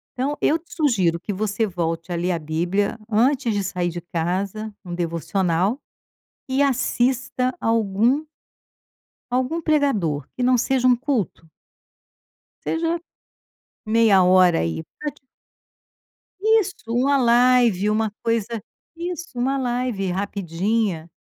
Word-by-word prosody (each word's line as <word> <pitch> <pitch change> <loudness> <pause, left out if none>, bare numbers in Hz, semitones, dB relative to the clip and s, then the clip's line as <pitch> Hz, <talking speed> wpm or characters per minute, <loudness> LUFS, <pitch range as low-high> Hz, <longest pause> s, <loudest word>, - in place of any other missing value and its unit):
Então 275 +4 -1
eu 315 - +3
te 335 - -16
sugiro 195 - +2
que 205 - -5
você 210 +2 -1
volte 170 -2 -3
a - - -1
ler 175 +2 0
a 170 - -1
bíblia 175 +8 -1
antes 240 +1 +2
de 200 -1 -1
sair 180 -2 -1
de 175 +1 -6
casa, 190 +6 -3
um 175 - -7
devocional, 175 - 0 0.7
e 265 +2 +2
assista 255 -1 0
algum 225 +6 +2 1.1
algum 260 +7 0
pregador 245 - +1
que 250 - -2
não 250 0 +4
seja 255 +1 +1
um 250 - +7
culto 235 - -2 1.2
seja 330 +1 0 0.9
meia 220 -3 +5
hora 180 -1 +5
aí 80 -1 -2 0.2
para 300 -1 -3
te 295 - -24 1.2
isso 435 -2 +3 0.2
um 245 +3 +1
live, 240 -5 +4
uma 215 0 +1
coisa 230 -1 -1 0.3
isso 345 -4 -6
uma 270 +3 +1
live 245 -7 -1
rapidinha, 195 -1 -1
220 Hz, 120 wpm, -22 LUFS, 180-255 Hz, 1.2 s, um